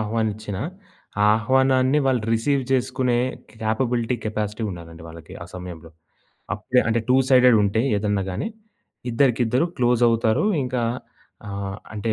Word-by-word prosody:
ఆహ్వానించినా, 110 -2 -2 0.6
ఆ - - +5
ఆహ్వానాన్ని 130 +4 +3
వాళ్ళు 125 -4 +1
రిసీవ్ 135 +4 +1
చేసుకునే 125 -1 +1 0.4
కేపబిలిటీ, 120 +2 0
కెపాసిటీ 110 0 -3
ఉండాలండి 85 -2 -10
వాళ్ళకి 80 0 -11
ఆ - - -7
సమయంలో. 85 -3 -8 0.6
అప్పుడే 115 +5 +1
అంటే 115 +1 +1
టూ 130 - +6
సైడెడుంటే 115 -5 +5 0.2
ఏదన్నా 100 -1 0
గాని, 95 - -3 0.6
ఇద్దరికిద్దరు 125 +3 +2
క్లోజవుతారు 120 - +2 0.2
ఇంకా 125 -1 -2 0.7
ఆహ్, 100 -1 -4 0.2
అంటే 110 +1 -1
115 Hz, 115 wpm, -23 LUFS, 105-125 Hz, 0.7 s, టూ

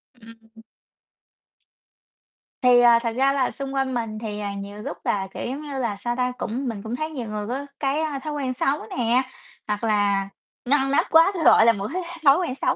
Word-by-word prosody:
Ừm. 225 -1 -17 2.0
Thì, 250 -1 +6
à, 235 -1 +6
thật 230 -1 -2
ra 270 +1 +3
là 265 -2 +1
xung 275 0 -6
quanh 265 -1 -1
mình 225 -3 -3
thì, 210 -2 -5
à, 200 -1 -3
nhiều 200 +1 -7
lúc - - -6
là, 190 -1 -1
kiểu, - - -5
giống 270 +4 -4
như 285 -3 -5
là, 230 -5 -1
sao 240 +4 -3
ta, 250 0 0
cũng 255 +3 -3
mình 215 -4 -4
cũng 225 +2 -4
thấy 310 +3 -3
nhiều 255 -7 -6
người 210 -1 -4
có 270 +4 -3
cái 285 +3 0 0.2
thói 305 +1 -5
quen 265 -3 -2
xấu 275 +1 -1
nè, 245 +1 +3 0.5
hoặc 210 +2 -2
là 205 -2 +1 0.4
ngăn 270 +1 +2
nắp 280 - +3
quá, 330 +4 +6
tui 340 -4 -3
gọi 225 - +7
là 230 - +6
một 200 0 -4
cái 370 - -1 0.2
thói 275 +2 +7
quen 340 -8 -2
xấu. - - 0
245 Hz, 210 wpm, -23 LUFS, 215-275 Hz, 2.0 s, gọi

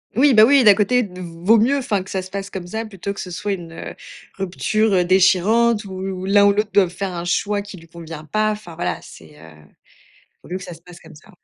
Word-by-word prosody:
Oui, 265 +2 +4
bah, 215 - +8
oui, 275 +2 +5
d'un 205 -3 +7
côté 220 +5 +2
d 185 -5 -7
vaut 175 +6 +2
mieux, 250 +6 +2
enfin, 205 -7 -1
que 190 - -14
ça 190 - -2
se 185 - -11
passe 195 +1 -6
comme 185 -2 -6
ça 220 +5 -4
plutôt 200 -2 -6
que - - -10
ce 180 - -6
soit 205 +3 -3
une, 175 -3 -7
heu, 165 - -8 0.4
rupture, 200 +3 0
heu, 180 -2 +3
déchirante 205 +5 +3
ou 190 -1 -5
l'un 200 +1 +4
ou 200 - +6
l'autre 210 +1 -1
doive 190 -2 +3
faire 185 +1 -5
un 170 0 -5
choix 205 +3 -1
qui 205 -1 -11
lui 165 -1 -15
convient 165 -2 -10
pas, 215 +7 0
enfin, 210 -6 -8
voilà, 90 - -3
c'est, 75 -2 -15
heu, 80 0 -14 0.9
vaut - - -16
mieux 180 - -3
que 185 - -7
ça - - -9
se 165 - -12
passe 175 0 -15
comme 160 0 -15
ça. 155 +7 -18
195 Hz, 250 wpm, -20 LUFS, 175-210 Hz, 0.9 s, bah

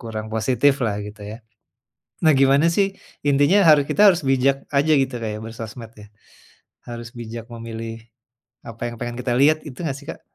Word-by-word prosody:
kurang 110 -1 -6
positif 130 +5 +2
lah 105 -2 -1
gitu 105 0 -11
ya. 110 - -7 0.9
Nah, 155 - +6
gimana 140 +4 +4
sih, 200 - +4 0.4
intinya 145 +8 +4
haru 150 -2 +7
kita - - -1
harus 175 - -3
bijak 135 +1 +3 0.2
aja 155 +3 +3
gitu 130 -1 -4
Kak 110 - -2
ya - - -6
bersosmed 115 0 -9
ya, 105 - -12 0.8
harus 120 0 -7
bijak 115 0 -7
memilih, 115 0 -7 0.7
apa 115 0 -11
yang 120 - -9
pengen 120 0 -5
kita 125 - -1
lihat, 155 +2 +4
itu 130 +1 -11
enggak 140 -3 -3
sih 145 - -16
Kak? - - -7
120 Hz, 180 wpm, -21 LUFS, 115-140 Hz, 0.9 s, haru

